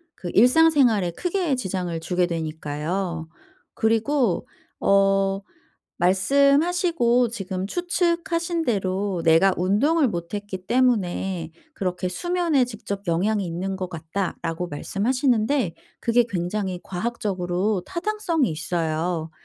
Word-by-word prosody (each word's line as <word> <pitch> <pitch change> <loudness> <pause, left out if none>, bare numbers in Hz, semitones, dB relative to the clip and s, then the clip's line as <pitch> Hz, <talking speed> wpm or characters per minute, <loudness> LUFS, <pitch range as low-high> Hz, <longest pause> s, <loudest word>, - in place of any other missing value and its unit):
그 175 - -6
일상 255 +9 +6
생활에 230 - +3
크게 350 - -1
지장을 185 -7 -3
주게 180 +1 +1
되니까요. 160 +1 -3 0.5
그리고 225 -1 +1 0.3
어 195 0 +3 0.6
말씀하시고 280 - +3
지금 190 -4 -4
추측하신 340 - 0
대로 195 -4 -1
"내가 165 +4 +5
운동을 265 - +2
못 170 -2 -5
했기 200 -2 -6
때문에 190 -8 +1 0.2
그렇게 185 -4 -2
수면에 340 - +1
직접 215 -4 -6
영향이 195 +5 +1
있는 180 +3 -3
것 185 -1 -4
같다."라고 165 0 -4
말씀하시는데 230 - 0 0.3
그게 235 +1 +3
굉장히 185 0 -2
과학적으로 190 -1 -2
타당성이 340 - -1
있어요. 160 0 -2
195 Hz, 265 characters per minute, -24 LUFS, 180-255 Hz, 0.6 s, 일상